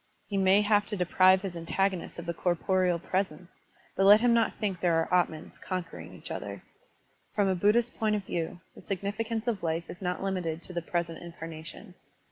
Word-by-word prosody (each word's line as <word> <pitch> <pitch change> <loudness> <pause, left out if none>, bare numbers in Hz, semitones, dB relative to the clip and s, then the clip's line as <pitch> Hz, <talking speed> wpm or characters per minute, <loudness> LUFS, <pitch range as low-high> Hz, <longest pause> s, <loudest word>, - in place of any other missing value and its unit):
He 200 - -4
may 195 +1 +5
have 205 -1 +3
to 210 - -4
deprive 185 +1 +4
his 190 -3 -4
antagonist 185 +2 -1
of 170 - -6
the 170 - -2
corporeal 180 +1 +1
presence, 185 -1 -3 0.4
but 195 - +2
let 205 +1 +9
him 245 -1 +4
not 230 -1 +2
think 195 -5 -2
there 175 -2 +2
are 165 +2 0
atmans, 155 -2 -11
con 185 -1 -2
quering 165 - -11
each - - -9
other. - - -6 0.7
From 205 -2 +3
a 190 - +3
Buddhist 210 +6 +2
point 215 -1 +2
of 205 - -2
view, 170 0 -3
the - - -13
significance 215 +4 -3
of 230 -5 -1
life 165 0 -2
is 180 - -11
not 180 0 -2
limited 175 -4 -2
to 180 - -5
the 170 - -2
present 170 -1 -2
incarnation. 165 +3 -9
185 Hz, 195 wpm, -29 LUFS, 170-205 Hz, 0.7 s, let